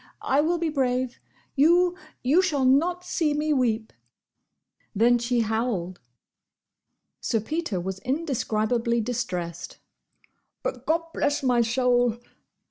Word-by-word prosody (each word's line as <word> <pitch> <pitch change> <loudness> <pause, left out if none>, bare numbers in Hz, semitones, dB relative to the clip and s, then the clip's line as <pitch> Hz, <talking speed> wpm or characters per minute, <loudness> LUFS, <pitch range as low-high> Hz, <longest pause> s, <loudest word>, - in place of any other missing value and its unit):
I 275 +2 +3
will 340 +3 +1
be 335 -1 -1
brave! 255 -3 -1 0.4
You—you—shall—not—see—me—weep!" 305 -5 +1 1.0
Then 240 +3 +4
she 240 0 +1
howled. 220 -5 -2 1.2
Sir 225 - 0
Peter 300 - -3
was 190 +2 -4
indescribably 235 - 0
distressed. 195 -8 -4 0.9
"But—Gobblessmysoul! 250 - +1
250 Hz, 65 wpm, -25 LUFS, 230-310 Hz, 1.2 s, Then